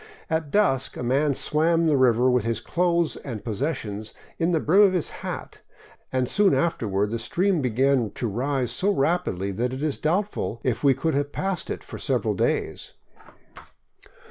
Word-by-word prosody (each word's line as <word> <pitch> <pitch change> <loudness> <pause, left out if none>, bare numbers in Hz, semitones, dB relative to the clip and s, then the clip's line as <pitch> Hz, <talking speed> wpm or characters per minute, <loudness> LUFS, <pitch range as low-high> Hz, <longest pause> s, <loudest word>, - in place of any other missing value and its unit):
At 160 -2 -1
dusk 140 -9 +1
a - - -4
man 140 +3 +1
swam 165 +4 +2
the 155 -2 +3
river 125 -2 +4
with 125 -3 +2
his 115 -1 -1
clothing 170 +6 0
and 115 -7 -6
pos 110 -3 -4
sessions 110 -8 -3 0.2
in 165 0 +2
the 165 -3 +2
brim 180 +7 +4
of 200 -2 +5
his 180 -4 0
hat, - - -6 0.5
and 130 -1 0
soon 205 +5 +3
afterward 105 - 0
the 115 - -2
stream 180 - +1
began 130 -1 +2
to 120 - -2
rise 125 +3 -1
so 185 - 0
rapidly 135 - 0
that 120 +6 -2
it 130 +3 -5
Is 155 -3 -1
doubtful 180 - -1
if 125 -1 -1
we 140 -2 +5
could 160 +4 -1
have 145 +1 -1
passed 190 -2 -3
it - - -4
for - - -9
several - - 0
days. - - -2
140 Hz, 175 wpm, -24 LUFS, 120-170 Hz, 0.5 s, of